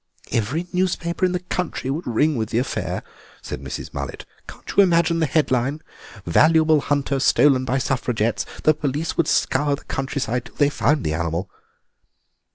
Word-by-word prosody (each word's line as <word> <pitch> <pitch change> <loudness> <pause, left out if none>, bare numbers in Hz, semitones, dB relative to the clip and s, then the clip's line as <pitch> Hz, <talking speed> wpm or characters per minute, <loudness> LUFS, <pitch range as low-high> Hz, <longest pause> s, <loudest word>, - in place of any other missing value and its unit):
"Every 130 +11 -1
newspaper 180 -1 0
in 180 - +1
the 180 -1 -2
country 180 -7 -3
would 155 +5 -4
ring 145 +6 +2
with 110 -3 -2
the 115 - -1
affair," 125 +3 -2 0.4
said - - -6
Mrs. 65 -2 -6
Mullet; - - -5 0.2
"can't - - -9
you - - +7
imagine 170 -3 +3
the 160 - +2
headline, 135 -1 +1 0.5
'Valuable 155 - +4
Hunter 140 -1 0
Stolen 135 0 +4
by 130 +1 0
Suffragettes'? 120 -4 -1 0.2
The 155 - +5
police 150 +2 -2
would 170 - +1
scour 145 +2 +2
the - - -15
countryside 135 -3 -2
till - - -15
they 145 -1 +3
found 145 0 +1
the 75 - -1
animal." 85 +3 -2
140 Hz, 165 wpm, -22 LUFS, 125-160 Hz, 0.5 s, you